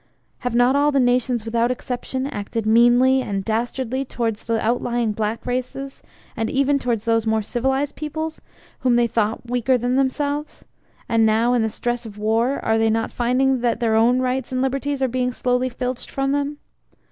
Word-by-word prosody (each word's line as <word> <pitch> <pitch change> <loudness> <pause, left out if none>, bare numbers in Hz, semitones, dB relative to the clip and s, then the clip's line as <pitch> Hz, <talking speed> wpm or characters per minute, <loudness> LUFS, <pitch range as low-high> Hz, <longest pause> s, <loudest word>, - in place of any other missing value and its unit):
Have 245 -2 -3
not 245 +2 +4
all 290 +1 +3
the 275 - +2
nations 245 -2 +1
without 230 +1 +1
exception 255 +1 -3
acted 225 -4 -4
meanly 240 +4 +5
and 195 -5 -3
dastardly 245 +3 -1
towards 230 -5 -3
the 230 -1 0
out 235 +3 0
lying 240 -2 0
black 215 +1 -3
races, 255 +2 -4 0.3
and 225 0 -2
even 275 +1 +2
towards 235 -4 -2
those 225 -1 +1
more 220 -1 +1
civilized 265 +5 -1
peoples 315 +1 -5 0.4
whom 250 -2 +2
they 240 0 +4
thought 225 0 -1
weaker 250 +1 +1
than 245 +2 0
themselves 285 +2 -2 0.4
and 225 -1 +2
now 220 +2 +3
in 245 - +2
the 220 - +1
stress 240 +2 -2
of 210 -1 -11
war 225 +5 +1
are 225 0 +2
they 225 0 +3
not 225 +1 0
finding 255 +1 +1
that 235 -2 0
their 230 -2 +1
own 235 +3 +4
rights 255 +1 -1
and 255 - -1
liberties 275 +1 -1
are - - +3
being 250 0 -1
slowly 250 +1 0
filched 250 0 -4
from 270 0 -1
them? 285 +1 -1
245 Hz, 185 wpm, -22 LUFS, 225-265 Hz, 0.4 s, meanly